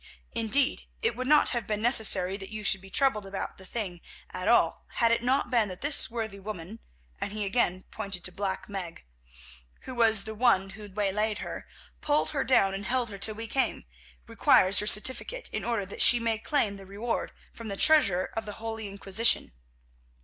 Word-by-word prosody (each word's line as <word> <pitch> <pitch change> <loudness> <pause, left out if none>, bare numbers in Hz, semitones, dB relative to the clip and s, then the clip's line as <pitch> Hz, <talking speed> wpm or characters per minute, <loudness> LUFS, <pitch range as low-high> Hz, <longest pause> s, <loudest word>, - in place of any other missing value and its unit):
Indeed, 235 +4 0 0.2
it 455 - +2
would 255 0 -4
not 300 +1 +5
have 240 -3 -3
been 210 -1 -2
necessary 210 -5 +3
that 195 -1 -8
you 215 -1 -7
should 195 -2 +2
be 195 - -13
troubled 265 -1 +2
about 195 0 -6
the 190 - -12
thing 185 -7 -5 0.3
at - - -5
all - - +2
had 230 -1 +3
it 230 - +2
not 255 +1 0
been 230 -5 +2
that 185 - -9
this 290 +1 +1
worthy 220 -4 -5
woman," 200 +1 -8 0.4
and 205 +1 -5
again 205 -2 +1
he 185 - -18
pointed 195 -3 -4
to 180 - -1
Black 195 0 -4
Meg, 185 - -7 0.8
"who 260 - -8
was 225 -4 +4
the 220 - -6
one 210 -4 +2
who 210 +1 -10
waylaid 210 +2 -1
her, - - -7 0.3
pulled 300 +1 +1
her 280 -3 -1
down 195 -7 +3
and 195 +1 -5
held 245 -2 0
her 200 - -8
till 215 +2 +3
we 225 +1 -5
came, 265 +4 -1 0.4
requires 185 +1 +4
your 210 - -2
certificate 260 - +2
in - - -3
order 230 -4 -1
that 195 - -6
she 240 - +8
may 230 -2 -1
claim 220 -5 -1
the 195 -1 -12
reward 215 +4 -3 0.2
from 230 - -9
the 200 -2 -5
Treasurer 195 - +4
of 225 0 -3
the 210 - -6
Holy 225 0 -5
Inquisition. 200 - +1
215 Hz, 195 wpm, -28 LUFS, 195-235 Hz, 0.8 s, she